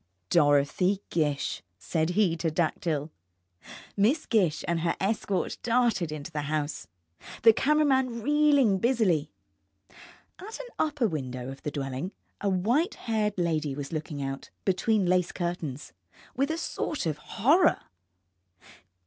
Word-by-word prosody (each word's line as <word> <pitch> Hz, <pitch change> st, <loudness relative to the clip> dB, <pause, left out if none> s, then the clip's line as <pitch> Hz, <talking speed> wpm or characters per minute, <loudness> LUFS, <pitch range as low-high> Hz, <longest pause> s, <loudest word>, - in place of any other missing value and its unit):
DOROTHY 150 Hz, +5 st, +3 dB
GISH, 150 Hz, -4 st, -1 dB, 0.2 s
said 160 Hz, -, -1 dB
he 190 Hz, -6 st, +3 dB
to 165 Hz, 0 st, -1 dB
Dactyl. 155 Hz, -2 st, -1 dB, 0.8 s
Miss 235 Hz, +11 st, +2 dB
Gish 185 Hz, -9 st, +1 dB
and 170 Hz, -1 st, +1 dB
her 170 Hz, +1 st, 0 dB
escort 200 Hz, -1 st, -1 dB
darted 235 Hz, -9 st, +1 dB
into 155 Hz, +2 st, -6 dB
the 150 Hz, -2 st, -2 dB
house, 150 Hz, -, -2 dB, 0.6 s
the 225 Hz, -1 st, +8 dB
camera 300 Hz, +6 st, +3 dB
man 260 Hz, -4 st, +1 dB
reeling 285 Hz, -7 st, +4 dB
busily. 190 Hz, -, +1 dB, 1.1 s
At 425 Hz, +5 st, -8 dB
an -, -, -7 dB
upper 295 Hz, -6 st, +1 dB
window 130 Hz, -6 st, -4 dB
of 135 Hz, -, -11 dB
the -, -, -3 dB
dwelling 140 Hz, +5 st, -4 dB, 0.3 s
a 200 Hz, -, +2 dB
white 235 Hz, -, +1 dB
haired 215 Hz, -3 st, -1 dB
lady 155 Hz, -5 st, 0 dB
was 140 Hz, +2 st, -6 dB
looking 150 Hz, -2 st, -4 dB
out, 135 Hz, 0 st, -5 dB, 0.2 s
between 200 Hz, +2 st, +2 dB
lace 180 Hz, 0 st, +2 dB
curtains, 170 Hz, -6 st, -4 dB, 0.4 s
with 275 Hz, +3 st, +1 dB
a 320 Hz, -, -1 dB
sort 310 Hz, -, -3 dB
of 155 Hz, -2 st, -2 dB
horror. 310 Hz, -, +3 dB
180 Hz, 130 wpm, -28 LUFS, 150-235 Hz, 1.1 s, the